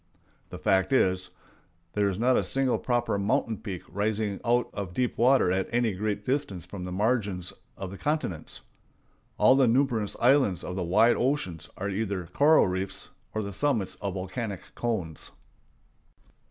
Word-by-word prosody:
The -, -, -7 dB
fact 95 Hz, +5 st, +2 dB
is, 95 Hz, -8 st, +2 dB, 0.6 s
there 100 Hz, -1 st, +2 dB
is 95 Hz, -, -3 dB
not 125 Hz, +3 st, +3 dB
a -, -, +2 dB
single 135 Hz, -2 st, +1 dB
proper 120 Hz, -4 st, 0 dB
mountain 110 Hz, +2 st, 0 dB
peak 95 Hz, -5 st, -6 dB
rising 105 Hz, +1 st, -2 dB
out 120 Hz, +1 st, +1 dB
of 95 Hz, -4 st, -5 dB
deep 125 Hz, -1 st, 0 dB
water 125 Hz, -5 st, +4 dB
at 95 Hz, 0 st, 0 dB
any 120 Hz, -1 st, +2 dB
great 105 Hz, +1 st, -3 dB
distance 125 Hz, -, -1 dB
from 90 Hz, 0 st, -7 dB
the 90 Hz, -, -5 dB
margins 100 Hz, -3 st, 0 dB, 0.2 s
of 95 Hz, -1 st, -6 dB
the 95 Hz, -, -9 dB
continents. 150 Hz, -, -3 dB, 0.8 s
All 130 Hz, -, +6 dB
the 135 Hz, -2 st, +4 dB
numerous 115 Hz, -4 st, +1 dB
islands 125 Hz, -, +3 dB
of 90 Hz, -, -5 dB
the 95 Hz, -, -2 dB
wide 110 Hz, +7 st, +4 dB
oceans 125 Hz, -, -1 dB
are 100 Hz, -, -3 dB
either 100 Hz, -3 st, -2 dB
coral 155 Hz, -2 st, +5 dB
reefs 95 Hz, +1 st, -3 dB, 0.3 s
or 110 Hz, -, 0 dB
the 100 Hz, 0 st, -5 dB
summits 115 Hz, -3 st, 0 dB
of 100 Hz, -2 st, -3 dB
volcanic 95 Hz, +2 st, -5 dB
cones. 95 Hz, -10 st, -3 dB
105 Hz, 160 wpm, -27 LUFS, 95-120 Hz, 0.8 s, All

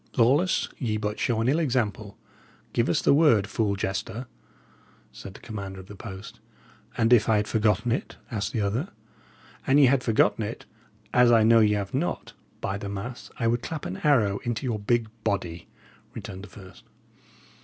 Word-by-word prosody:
'" -, -, -21 dB
"Lawless, 140 Hz, +10 st, +3 dB
ye 110 Hz, -5 st, -1 dB
but 105 Hz, 0 st, -3 dB
show 115 Hz, -2 st, 0 dB
an 115 Hz, -, 0 dB
ill 145 Hz, +5 st, +3 dB
example; 115 Hz, -8 st, -1 dB, 0.6 s
give -, -, +1 dB
us -, -, +1 dB
the -, -, +5 dB
word, 140 Hz, -10 st, +4 dB
fool 100 Hz, -1 st, -1 dB
jester," 100 Hz, +5 st, -3 dB, 0.9 s
said 100 Hz, 0 st, -10 dB
the -, -, -11 dB
commander 100 Hz, -4 st, -7 dB
of 95 Hz, -, -10 dB
the 105 Hz, -, -11 dB
post. 105 Hz, +3 st, -9 dB, 0.6 s
"And 115 Hz, 0 st, +4 dB
if 115 Hz, -2 st, +4 dB
I 110 Hz, -, +4 dB
had 105 Hz, 0 st, +1 dB
forgotten 110 Hz, +1 st, +1 dB
it?" 120 Hz, -, -2 dB, 0.2 s
asked 105 Hz, -3 st, -2 dB
the 110 Hz, -, -1 dB
other. 110 Hz, -, -1 dB, 0.8 s
"An 135 Hz, -, +5 dB
ye 145 Hz, -, +7 dB
had 130 Hz, 0 st, +3 dB
forgotten 115 Hz, -1 st, +2 dB
it 105 Hz, -, -6 dB, 0.5 s
as 125 Hz, -1 st, +5 dB
I 115 Hz, -2 st, +5 dB
know 115 Hz, +1 st, +6 dB
y' 105 Hz, -1 st, +4 dB
'ave 100 Hz, +3 st, -3 dB
not 160 Hz, +6 st, -2 dB, 0.3 s
by 100 Hz, +1 st, -2 dB
the 100 Hz, -, -5 dB
mass, 105 Hz, +5 st, -6 dB
I 115 Hz, -, -2 dB
would 120 Hz, +1 st, +1 dB
clap 160 Hz, +2 st, -5 dB
an 90 Hz, -, -4 dB
arrow 110 Hz, -9 st, +2 dB
into 120 Hz, +2 st, -3 dB
your 115 Hz, -4 st, -1 dB
big 115 Hz, +2 st, +1 dB, 0.2 s
body," 90 Hz, -6 st, -2 dB, 0.5 s
returned 95 Hz, +1 st, -7 dB
the -, -, -15 dB
first. 95 Hz, -2 st, -14 dB
110 Hz, 185 wpm, -26 LUFS, 100-120 Hz, 0.9 s, ye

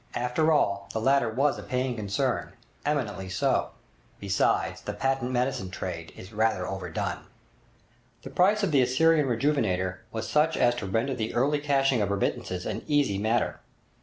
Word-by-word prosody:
After 125 Hz, +6 st, +1 dB
all, 100 Hz, -, +1 dB
the 110 Hz, -, -1 dB
latter 135 Hz, 0 st, +3 dB
was 135 Hz, +6 st, +1 dB
a -, -, -6 dB
paying 125 Hz, 0 st, -2 dB
concern—eminently 105 Hz, +1 st, -3 dB
so! 95 Hz, -, +1 dB, 0.5 s
Besides, 100 Hz, -1 st, 0 dB
the -, -, -5 dB
patent 135 Hz, -2 st, 0 dB
medicine 125 Hz, -5 st, -1 dB
trade 85 Hz, -3 st, -6 dB
is 95 Hz, +4 st, -11 dB
rather 110 Hz, -4 st, +1 dB
overdone. 95 Hz, 0 st, -3 dB, 1.0 s
The -, -, -8 dB
price 205 Hz, +4 st, +3 dB
of 195 Hz, -, +1 dB
the 140 Hz, -3 st, +5 dB
'Assyrian 150 Hz, +4 st, +3 dB
Rejuvenator' 110 Hz, -8 st, 0 dB
was 110 Hz, -, -4 dB
such 155 Hz, +2 st, +2 dB
as 120 Hz, 0 st, +4 dB
to 100 Hz, -, -4 dB
render 115 Hz, +8 st, 0 dB
the 110 Hz, -3 st, -3 dB
early 140 Hz, +5 st, +2 dB
cashing 135 Hz, -4 st, +2 dB
of 100 Hz, -, 0 dB
remittances 90 Hz, -2 st, -2 dB
an 110 Hz, 0 st, -3 dB
easy 140 Hz, -10 st, +2 dB
matter. 110 Hz, +3 st, 0 dB
120 Hz, 155 wpm, -27 LUFS, 100-140 Hz, 1.0 s, the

